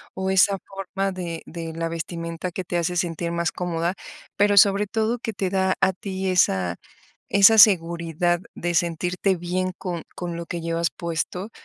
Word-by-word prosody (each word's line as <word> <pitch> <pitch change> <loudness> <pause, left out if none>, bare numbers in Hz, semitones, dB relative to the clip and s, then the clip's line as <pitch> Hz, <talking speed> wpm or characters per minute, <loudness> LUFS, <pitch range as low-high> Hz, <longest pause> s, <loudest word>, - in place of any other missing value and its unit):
o 190 0 -2
esa 195 +1 +4
forma 195 0 -3
de 170 -3 -5
de 165 -1 -6
la 165 +1 -2
vestimenta 165 +1 -5
que 185 +1 -5
te 175 - -2
hace 175 +1 -1
sentir 170 0 -2
más 170 0 -1
cómoda, 175 0 -2 0.4
pero 205 0 +3
sobre 200 0 +6
todo 220 +3 -1
que 225 - -4
te 190 -2 -2
da 190 -1 +1
a 190 -1 +3
ti 190 0 -4
esa 95 - +2 0.5
esa 200 +3 +6
seguridad 170 -3 +4
de 175 0 -3
sentirte 175 +3 0
bien 185 +2 -2
con 175 -3 -4
con 175 -1 -5
lo 170 0 -5
que 170 - -4
llevas 165 0 -1
puesto 180 +4 -4
180 Hz, 170 wpm, -24 LUFS, 170-190 Hz, 0.5 s, sobre